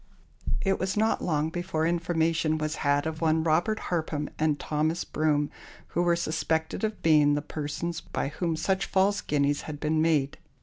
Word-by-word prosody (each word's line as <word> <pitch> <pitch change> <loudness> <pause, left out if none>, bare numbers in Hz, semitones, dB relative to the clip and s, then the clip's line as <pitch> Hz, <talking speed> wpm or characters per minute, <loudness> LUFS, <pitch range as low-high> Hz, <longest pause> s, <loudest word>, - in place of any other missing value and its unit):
It 195 -1 +1
was 190 +2 -1
not 220 +1 +2
long 155 -2 0
before 175 -2 -1
information 165 -2 +1
was 155 0 -2
had 145 0 +1
of 160 0 -4
one 160 0 +2
Robert 170 +7 +2
Harpham 155 -3 -1
and 155 -2 +1
Thomas 155 +3 -1
Broom, 150 -1 0 0.4
who 175 - 0
were 175 -1 +3
suspected 160 +1 -1
of 215 -1 -2
being 150 -2 +5
the 145 - -1
persons 160 +3 -4
by 140 - -3
whom 165 +2 -2
such 190 +4 0
false 195 +2 +2
guineas 145 -1 +1
had 145 -1 -6
been 155 +1 +1
made. 150 -4 +1
160 Hz, 170 wpm, -27 LUFS, 150-170 Hz, 0.4 s, being